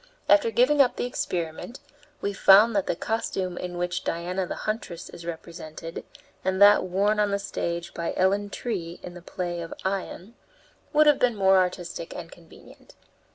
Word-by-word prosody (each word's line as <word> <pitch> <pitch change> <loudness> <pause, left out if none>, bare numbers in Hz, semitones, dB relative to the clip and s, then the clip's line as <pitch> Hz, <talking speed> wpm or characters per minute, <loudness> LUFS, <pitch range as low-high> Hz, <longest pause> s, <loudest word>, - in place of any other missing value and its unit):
After 300 -6 +5
giving 250 +6 +4
up 255 - +3
the - - -2
experiment, 180 - -4 0.4
we 200 - -1
found 205 +4 +6
that 200 - +1
the - - 0
costume 190 -3 -2
in 180 0 -5
which 175 +1 -2
Diana 180 +2 -2
the - - -4
Huntress 215 -6 -4
is 170 - -10
represented, 165 0 -7 0.4
and 190 0 0
that 205 +1 +7
worn 200 +4 +1
on 210 -1 +3
the 200 - +1
stage 170 -3 -4
by 170 - -3
Ellen 200 +2 +2
Tree 180 -7 -4
in 175 - -8
the 175 - -11
play 175 -1 -4
of 165 - -7
"Ion," 195 +2 -3 0.6
would 305 0 +5
have 295 -2 +5
been 245 -2 +2
more 190 -1 +4
artistic 180 -2 -3
and 170 -1 -8
convenient. 165 -2 -17
185 Hz, 170 wpm, -26 LUFS, 175-210 Hz, 0.6 s, that